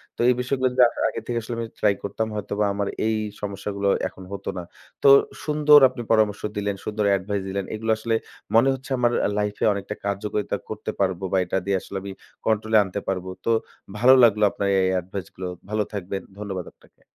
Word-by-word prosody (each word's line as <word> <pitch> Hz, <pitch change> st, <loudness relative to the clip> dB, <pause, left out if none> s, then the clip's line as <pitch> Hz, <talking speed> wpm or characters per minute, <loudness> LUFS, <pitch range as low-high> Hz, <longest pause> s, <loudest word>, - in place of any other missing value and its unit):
তো -, -, -31 dB
এই 125 Hz, -, +6 dB
বিষয়গুলা 130 Hz, +1 st, 0 dB
য -, -, -2 dB
আ -, -, -2 dB, 0.2 s
আগে -, -, -5 dB
থেকে 120 Hz, -1 st, -1 dB
আসলে 115 Hz, +2 st, -5 dB
আমি 115 Hz, -, -3 dB
try 105 Hz, -1 st, +4 dB
করতাম 110 Hz, +2 st, -2 dB
হয়তোবা 105 Hz, 0 st, -1 dB
আমার 100 Hz, 0 st, -2 dB, 0.2 s
এই 110 Hz, -, +1 dB, 0.3 s
সমস্যাগুলো 100 Hz, 0 st, -3 dB, 0.2 s
এখন 95 Hz, -, -12 dB
হতো 100 Hz, -, -5 dB
না। 90 Hz, -, -4 dB, 0.4 s
তো 140 Hz, -, +7 dB, 0.4 s
সুন্দর 150 Hz, -1 st, +6 dB
আপনি 125 Hz, -1 st, -7 dB
পরামর্শ 110 Hz, -2 st, +3 dB, 0.2 s
দিলেন, 100 Hz, -1 st, -1 dB
সুন্দর 105 Hz, -1 st, -1 dB
advice 100 Hz, +1 st, -3 dB
দিলেন। 100 Hz, 0 st, -2 dB
এগুলা 110 Hz, +1 st, 0 dB
আসলে 115 Hz, 0 st, 0 dB, 0.4 s
মনে 120 Hz, +4 st, +6 dB
হচ্ছে 135 Hz, +1 st, -9 dB
আমার 120 Hz, -1 st, +2 dB, 0.3 s
life-এ 105 Hz, 0 st, -1 dB
অনেকটা 100 Hz, +1 st, -5 dB
কার্যকারিতা 100 Hz, +1 st, -2 dB
করতে -, -, -4 dB
পারবো 95 Hz, -1 st, 0 dB
বা 95 Hz, -, +2 dB
এটা 90 Hz, -, -1 dB
দিয়ে 100 Hz, -1 st, +1 dB
আসলে 95 Hz, 0 st, -7 dB
আমি 100 Hz, -, -6 dB, 0.4 s
control-এ 110 Hz, 0 st, +2 dB
আনতে 95 Hz, +1 st, -4 dB
পারবো। 95 Hz, -1 st, -2 dB, 0.2 s
তো -, -, 0 dB, 0.5 s
ভালো 125 Hz, +4 st, +7 dB
লাগলো 105 Hz, -2 st, +5 dB
আপনার 100 Hz, -, -2 dB
এই 95 Hz, -, +2 dB
adviceগুলো। 95 Hz, 0 st, -7 dB, 0.2 s
ভালো 105 Hz, 0 st, +1 dB
থাকবেন। 95 Hz, -1 st, -4 dB, 0.2 s
ধন্যবাদ 95 Hz, -4 st, -4 dB
আপনাকে। -, -, -27 dB
105 Hz, 190 wpm, -24 LUFS, 100-110 Hz, 0.5 s, তো